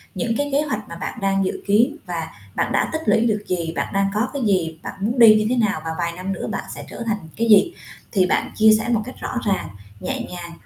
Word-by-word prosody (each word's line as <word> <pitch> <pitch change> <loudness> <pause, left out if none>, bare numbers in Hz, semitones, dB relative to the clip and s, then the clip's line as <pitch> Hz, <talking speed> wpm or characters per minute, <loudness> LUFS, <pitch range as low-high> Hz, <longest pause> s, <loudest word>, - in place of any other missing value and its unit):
những 225 +6 -1
cái 285 0 -1
kế 280 - +3
hoạch 215 - -3
mà 170 - -7
bạn 195 - -5
đang 195 -1 +1
dự - - -3
kiến 235 +8 +4
và 170 -3 -3 0.3
bạn - - 0
đã - - +1
tích 315 - -1
lũy 225 - +4
được 210 -2 0
gì, 170 -2 -2
bạn - - -2
đang 195 0 +2
có 215 +4 +1
cái 280 - -3
gì, 165 -5 +1
bạn - - -5
muốn 235 +5 0
đi 225 -2 +9
như 215 0 +2
thế 250 - +2
nào 205 -8 +1
và 160 - -2
vài 170 -1 -1
năm 185 +3 -4
nữa - - -5
bạn - - -3
sẽ - - -8
trở 235 - -6
thành 220 -2 0 0.2
cái 230 - 0
gì 210 - +6 0.4
thì 190 -4 +3
bạn - - 0
chia 220 0 +6
sẻ 240 - -3
một 230 -3 +2
cách 255 - -8
rõ 250 - -2
ràng, 190 - 0 0.3
nhẹ - - -3
nhàng, 175 -1 -7
210 Hz, 265 wpm, -22 LUFS, 180-230 Hz, 0.4 s, đi